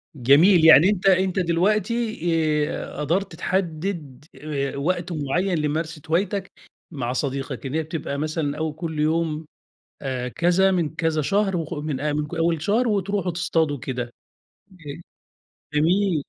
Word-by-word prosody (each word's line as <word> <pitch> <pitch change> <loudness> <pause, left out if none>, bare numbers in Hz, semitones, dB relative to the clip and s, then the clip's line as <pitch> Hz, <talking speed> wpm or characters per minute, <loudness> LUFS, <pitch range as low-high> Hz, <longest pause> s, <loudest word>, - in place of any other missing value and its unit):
جميل 155 +7 +5
يعني 160 +3 +8
أنت 200 -3 -1
أنت 190 0 +3
دلوقتي، 210 +6 0 0.5
آآ - - -6
قدرت 175 +5 -1
تحدّد 165 -5 -3
آآ 140 -2 -3
وقت 175 +4 -1
معين 170 +4 0
لممارسة 155 +1 -2
هوايتك 190 +3 0 0.4
مع 125 -6 -3
صديقك، 135 0 -3
إن 135 - -4
هي 160 - +1
بتبقى 155 -2 -4
مثلًا 150 -1 -2
أو 155 -1 -2
كلّ 160 0 -5
يوم، 160 0 0 0.6
آآ 130 -3 -3
كذا 175 +8 +2
من 165 -5 -1
كذا 160 -1 0
شهر 195 +4 +1
وخ 165 0 -4
من 150 -1 -2
من 150 +3 -3
أول 165 -1 +1
شهر 225 +8 +1
وتروحوا 200 -3 0
تصطادوا 160 -4 0
كده، 125 -2 -5 0.6
ج 185 - -19 0.9
جميل. 170 +1 +2
160 Hz, 135 wpm, -23 LUFS, 150-185 Hz, 0.9 s, يعني